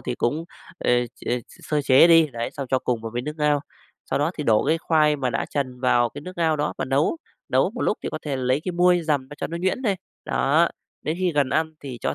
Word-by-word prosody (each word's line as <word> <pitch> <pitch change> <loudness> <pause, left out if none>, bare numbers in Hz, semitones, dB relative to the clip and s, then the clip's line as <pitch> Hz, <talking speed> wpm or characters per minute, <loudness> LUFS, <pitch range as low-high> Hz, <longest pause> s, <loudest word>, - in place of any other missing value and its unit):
thì 120 0 -3
cũng, 150 +9 -1 0.3
ờ, - - 0 0.2
chê 120 0 -2
s - - -17
sơ 150 -1 +1
chế 135 +5 +7
đi, 165 -2 +7
đấy, 115 0 -3
sau 140 - -5
cho 130 - +3
cùng 120 -3 -2
vào 115 - -5
với 120 - -2
nước 150 +3 -4
ngao. 150 -2 +2 0.5
Sau - - +1
đó 150 +3 +1
thì 150 - -2
đổ 110 -2 +3
cái 160 +3 +2
khoai 155 -2 +3
mà 130 -3 -1
đã - - -1
chần 130 -3 -3
vào 120 -2 +3
cái 145 +5 -9
nước 185 +4 -9
ngao 160 -2 +2
đó 150 +1 -1
và - - -1
nấu, 135 - +1 0.3
nấu - - +2
một - - -7
lúc - - +1
thì - - -2
có - - -3
thể 145 -3 -2
lấy 130 +2 +1
cái 185 - -2
muôi 175 0 +3
dầm 150 -4 +1
ra 145 - -9
cho - - -2
nó 170 - -5
nhuyễn 190 +9 -1
đi, 205 -5 +2 0.3
đó. 155 +5 +2 0.3
Đến 155 - -2
khi 180 -2 +1
gần 145 -3 +2
ăn 160 +2 0
thì 130 -4 -7
cho - - -1
145 Hz, 265 wpm, -24 LUFS, 130-160 Hz, 0.5 s, chế